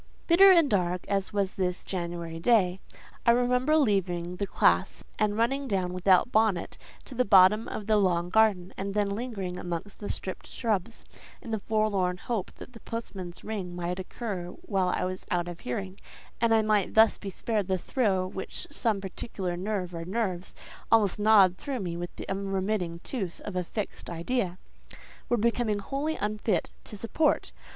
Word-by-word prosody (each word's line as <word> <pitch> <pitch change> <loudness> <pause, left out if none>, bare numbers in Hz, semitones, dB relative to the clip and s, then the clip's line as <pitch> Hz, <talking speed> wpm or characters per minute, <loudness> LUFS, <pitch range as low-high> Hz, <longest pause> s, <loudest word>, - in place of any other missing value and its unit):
Bitter 380 +3 +8
and 335 -5 +6
dark 180 -6 0
as 195 -1 -1
was 200 -2 0
this 180 -1 -2
January 170 -2 -4
day, 190 -3 +3 0.4
I - - +3
remember 250 +5 +3
leaving 180 - 0
the 200 - -2
classe, - - +2 0.2
and 210 -1 +1
running 270 +5 +1
down 185 -5 -1
without 185 +5 +3
bonnet 215 -5 +1 0.3
to - - -10
the 250 0 +2
bottom 195 +1 +6
of 210 - -5
the 215 0 +3
long 175 -3 +2
garden, 205 -4 +3
and 195 +1 -3
then 205 -1 +2
lingering 200 -5 -4
amongst 175 +3 -5
the 205 - -6
stripped 185 - -5
shrubs, 225 -2 -2 0.3
in 230 - -8
the 220 - 0
forlorn 200 -4 0
hope 215 0 -3
that 250 - -12
the 230 - -11
postman's 190 -7 -6
ring 195 -5 -4
might 175 +1 -3
occur 185 -2 -5 0.2
while 190 -3 0
I 180 - 0
was 185 0 -4
out 175 -1 0
of 175 -1 -7
hearing, 185 +10 -5 0.4
and 230 -1 +3
I 220 -1 +5
might 210 -3 +1
thus 220 0 +6
be 200 - -5
spared 210 +1 -2
the 190 -1 +1
thrill 190 -3 0
which 190 0 -6
some 225 -8 0
particular 190 -1 -4
nerve 185 -1 -3
or 165 0 -4
nerves, 185 -1 -3 0.4
almost 210 -4 +4
gnawed 205 -4 +6
through 205 -12 -3
with 175 0 -6
the - - -8
unremitting 195 -3 -2
tooth 195 -10 -4
of 205 - -6
a 180 - 0
fixed 205 +4 -5
idea, 180 +2 -2 0.7
were 240 - +3
becoming 230 -1 +1
wholly 280 +9 -2
unfit 210 -2 -1
to 210 - -7
support. 285 +8 +1
200 Hz, 170 wpm, -28 LUFS, 180-225 Hz, 0.7 s, Bitter